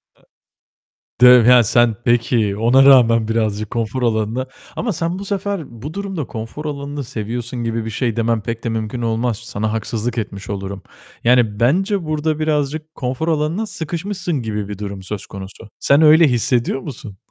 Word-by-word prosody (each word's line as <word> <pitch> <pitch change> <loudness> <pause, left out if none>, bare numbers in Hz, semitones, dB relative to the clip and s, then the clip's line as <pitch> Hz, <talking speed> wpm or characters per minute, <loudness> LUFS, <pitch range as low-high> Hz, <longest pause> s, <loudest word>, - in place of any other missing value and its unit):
Aaa. - - -31 1.0
Diyorum 125 -2 +8
ya 125 -1 +7
sen 120 0 +3
Peki, 115 -4 +2
ona 120 +5 +5
rağmen 115 -5 +6
birazcık 110 -2 -1
konfor 115 +2 -2
alanına 115 +3 0 0.3
Ama 230 -3 -2
sen 170 +3 -2
bu 200 - -6
sefer 195 - -4
bu 150 +4 -6
durumda 195 -7 -4
konfor 115 +7 -7
alanını 145 -1 -4
seviyorsun 120 0 -5
gibi 115 -1 -2
bir 115 - -3
şey 115 0 -1
demem 115 -1 0
pek 115 +1 -5
de 115 - -1
mümkün 110 +1 -3
olmaz. 115 0 -1
Sana 110 -2 -3
haksızlık 115 +2 -3
etmiş 100 -2 -5
olurum. 100 -1 -5 0.4
Yani, 120 -4 +3
bence 185 - +1
burada 155 0 -1
birazcık 155 0 -1
konfor 130 +5 -3
alanına 160 +7 0
sıkışmışsın 175 -2 -3
gibi 105 -3 -3
bir 105 - -5
durum 100 -2 -6
söz 100 +1 -5
konusu. 100 +3 -10
Sen 140 +2 +4
öyle 155 +1 +7
hissediyor 120 +1 +1
musun? 130 -8 -9
120 Hz, 165 wpm, -19 LUFS, 110-150 Hz, 1.0 s, Diyorum